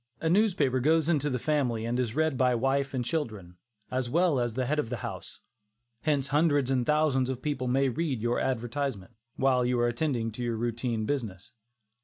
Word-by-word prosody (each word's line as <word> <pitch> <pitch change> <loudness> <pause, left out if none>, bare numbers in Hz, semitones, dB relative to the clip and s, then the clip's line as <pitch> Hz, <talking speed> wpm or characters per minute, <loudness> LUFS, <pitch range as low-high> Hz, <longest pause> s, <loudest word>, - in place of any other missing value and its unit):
A 160 - 0
newspaper 180 - +2
goes 160 +4 +2
into 150 -3 +1
the 130 - -1
family 125 -5 0
and 120 +2 -1
is 120 -3 -1
read 160 -2 +1
by 125 -1 +3
wife 135 +3 0
and 125 -2 -1
children, 110 - -4 0.3
as 130 -1 -1
well 165 -1 +2
as 120 -2 -1
the 130 0 0
head 150 +4 0
of 120 - -2
the 125 - -3
house; - - -8 0.6
hence 140 -3 0
hundreds 145 -2 +2
and 125 -2 +1
thousands 150 -4 +2
of 130 -1 -4
people 140 -4 -2
may 135 +2 +2
read 140 -1 -1
your 120 +2 0
advertisement, 120 -4 -2 0.2
while 130 -2 +2
you 125 0 +1
are 120 - +3
attending 120 -2 -1
to 115 - -8
your 120 -2 -1
routine 115 -1 -2
business. 110 -7 -4
130 Hz, 195 wpm, -28 LUFS, 120-145 Hz, 0.6 s, by